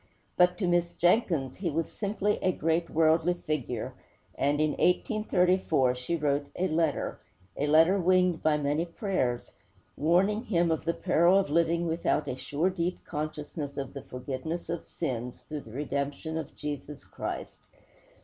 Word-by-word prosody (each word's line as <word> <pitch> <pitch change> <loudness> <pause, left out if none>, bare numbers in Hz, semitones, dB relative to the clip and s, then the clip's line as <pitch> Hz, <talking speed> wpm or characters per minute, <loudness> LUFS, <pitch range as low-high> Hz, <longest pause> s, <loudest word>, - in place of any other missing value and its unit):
But, 180 0 +4
to 190 - 0
Miss 175 0 +2
Jenkins, 175 - +2
he 180 -3 -1
was 165 +1 -2
simply 205 0 -1
a 185 - +3
great 165 0 0
worldly 165 +2 +3
figure, 130 -7 -3 0.4
and, 145 +1 +1
in 155 0 +2
1834, 180 - +2
she 125 +7 -3
wrote 145 -2 0
a 185 - +1
letter 160 -3 0 0.4
a 145 - -1
letter 165 +6 +5
winged 180 -1 +3
by 155 -1 +3
many 145 +2 0
prayers 170 - -2 0.4
warning 190 - +2
him 170 -6 +2
of 160 - -1
the 170 - 0
peril 170 +4 +4
of 195 -7 +1
living 170 +1 +2
without 165 -2 0
a 125 - -2
sure, 150 +7 -1
deep 180 0 -3
consciousness 150 -1 -5
of 135 -2 -4
the 140 - -6
forgiveness 135 +7 -5
of 170 - -4
sins, 125 -6 -4
through 150 -1 -6
the 110 - -13
redemption 140 +4 -3
of 160 -3 -5
Jesus 145 -1 -6
Christ. - - -6
160 Hz, 155 wpm, -29 LUFS, 145-175 Hz, 0.4 s, letter